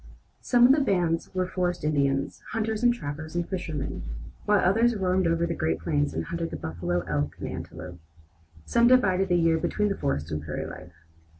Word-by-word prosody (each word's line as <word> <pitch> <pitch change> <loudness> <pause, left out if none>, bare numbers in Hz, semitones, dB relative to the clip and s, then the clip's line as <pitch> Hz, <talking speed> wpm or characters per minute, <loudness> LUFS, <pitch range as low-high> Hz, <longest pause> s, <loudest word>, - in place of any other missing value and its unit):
Some 245 -1 +5
of 255 - +7
the 290 +2 +4
bands 175 -7 +1
were 185 0 +1
forest 180 -2 -2
Indians, 140 -2 0
hunters 220 -1 -1
and 240 0 +5
trappers 155 -7 -6
and 175 -1 -1
fishermen, 165 -6 -4 0.4
while 210 0 +4
others 225 +6 +3
roamed 185 -2 +1
over 165 0 +1
the 170 - -2
Great 80 - 0
Plains 75 -3 0
and 80 +1 -2
hunted 170 -1 -3
the - - -5
buffalo, 85 +2 -2
elk, 75 -4 -2
and - - -4
antelope. 90 0 -7 0.7
Some 235 0 +4
divided 195 -7 +4
the 175 - +3
year 165 -1 +3
between 210 +5 0
the 200 - -1
forest 75 +4 -2
and 75 0 -2
prairie 75 0 -4
life. 90 -1 -10
170 Hz, 190 wpm, -27 LUFS, -, 0.7 s, of